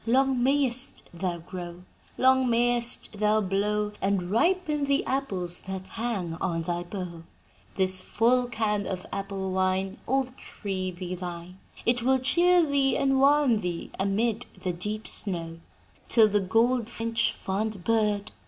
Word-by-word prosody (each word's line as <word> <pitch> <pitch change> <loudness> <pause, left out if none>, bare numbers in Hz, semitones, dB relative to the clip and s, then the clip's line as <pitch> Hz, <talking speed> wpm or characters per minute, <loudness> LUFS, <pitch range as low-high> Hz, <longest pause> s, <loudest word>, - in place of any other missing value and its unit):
Long 260 +1 +3
mayest 265 -1 +2
thou 175 0 -2
grow. 175 +1 -7
And 180 +1 -16 0.4
long 260 -1 +5
mayest 235 -2 +1
thou 210 0 +3
blow, 210 +1 0
and 190 -2 0
ripen 310 - +1
the 280 0 +1
apples 190 -10 -2
that 190 -1 -5
hang 215 -7 -3
on 165 -2 -1
thy 175 +1 -2
bough! 175 -2 -6 0.5
"'"This 185 -1 +3
full 245 +5 +2
can 215 -3 -1
of 185 -1 -4
apple 195 -1 -3
wine, 190 +1 0
Old 265 0 0
tree, 190 -3 -4
be 180 0 -6
thine: 180 0 -7 0.3
It 240 +1 +2
will 265 +2 +3
cheer 345 +6 +3
thee 280 -2 +2
and 270 -1 +2
warm 280 -4 +4
thee 175 -2 -4
amid 215 +4 0 0.2
the 180 -2 -1
deep 210 +5 -4
snow; 165 -4 -3 0.5
"'"Till 225 -2 +5
the 205 0 +2
goldfinch 230 +2 +1
fond 200 0 -3
bird! 210 -1 +1
210 Hz, 145 wpm, -27 LUFS, 185-245 Hz, 0.5 s, long